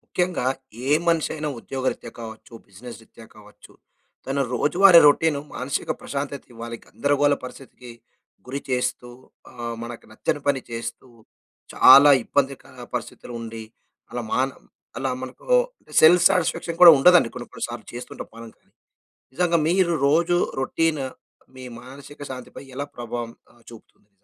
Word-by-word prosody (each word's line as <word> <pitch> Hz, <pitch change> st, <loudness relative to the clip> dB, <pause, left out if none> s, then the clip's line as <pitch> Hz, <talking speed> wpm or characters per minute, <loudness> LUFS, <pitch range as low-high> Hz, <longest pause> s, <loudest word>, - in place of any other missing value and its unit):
ముఖ్యంగా 180 Hz, -7 st, 0 dB, 0.4 s
ఏ -, -, +1 dB, 0.2 s
మనిషి 165 Hz, -2 st, +2 dB
అయినా 150 Hz, -1 st, -3 dB
ఉద్యోగరీత్యా 130 Hz, -3 st, -4 dB
కావచ్చు, 110 Hz, 0 st, -10 dB, 0.2 s
బిజినెస్ 115 Hz, +6 st, -11 dB
రీత్యా 115 Hz, 0 st, -16 dB
కావచ్చు 105 Hz, -1 st, -17 dB, 0.5 s
తన 135 Hz, +1 st, -2 dB
రోజువారీ 175 Hz, +7 st, +6 dB
రౌటీన్ 150 Hz, +1 st, +4 dB, 0.2 s
మానసిక 130 Hz, +2 st, -3 dB
ప్రశాంతత 140 Hz, 0 st, -5 dB
ఇవ్వాలి 115 Hz, 0 st, -7 dB
గందరగోళ 145 Hz, 0 st, +1 dB
పరిస్థితికి 125 Hz, -1 st, -11 dB, 0.6 s
గురి 135 Hz, +2 st, -4 dB
చేస్తూ 125 Hz, -1 st, -2 dB, 0.4 s
ఆహ్, 120 Hz, -1 st, -6 dB
మనకు 120 Hz, 0 st, -9 dB
నచ్చని 125 Hz, +6 st, -3 dB
పని 140 Hz, -2 st, +1 dB
చేస్తూ 115 Hz, +2 st, -6 dB, 0.7 s
చాలా 140 Hz, +2 st, +8 dB
ఇబ్బందిక 140 Hz, +1 st, -1 dB, 0.3 s
పరిస్థితులు 120 Hz, 0 st, -6 dB
ఉండి 115 Hz, -1 st, -7 dB, 0.5 s
అలా 120 Hz, -, -4 dB
మాన్ 130 Hz, +1 st, 0 dB, 0.4 s
అలా 135 Hz, +1 st, -2 dB
మనకు 130 Hz, 0 st, -10 dB, 0.3 s
అంటె -, -, -19 dB
సెల్ఫ్ 170 Hz, +3 st, +7 dB
సాటిస్ఫాక్షన్ 170 Hz, -1 st, -1 dB
కూడా 175 Hz, -2 st, +12 dB
ఉండదండి 175 Hz, -2 st, +5 dB
కొన్ని 120 Hz, -, -8 dB
కొన్ని -, -, -3 dB
సార్లు 120 Hz, -1 st, -8 dB
చేస్తూంటాం 120 Hz, +1 st, -8 dB
మనం. 115 Hz, 0 st, -10 dB, 0.8 s
నిజంగా 170 Hz, +2 st, +1 dB
మీరు 175 Hz, 0 st, +2 dB
రోజు 170 Hz, +4 st, +2 dB, 0.2 s
రౌటీన్ 155 Hz, +2 st, 0 dB, 0.5 s
మీ 130 Hz, -, -10 dB, 0.2 s
మానసిక 140 Hz, +3 st, -13 dB
శాంతి 130 Hz, -1 st, -9 dB
పై -, -, -9 dB
ఎలా 140 Hz, +2 st, -4 dB
ప్రభావం 120 Hz, -1 st, -5 dB, 0.2 s
ఆహ్, 120 Hz, -1 st, -25 dB
చూపుతుంది? 110 Hz, -2 st, -17 dB
130 Hz, 135 wpm, -23 LUFS, 120-150 Hz, 0.8 s, కూడా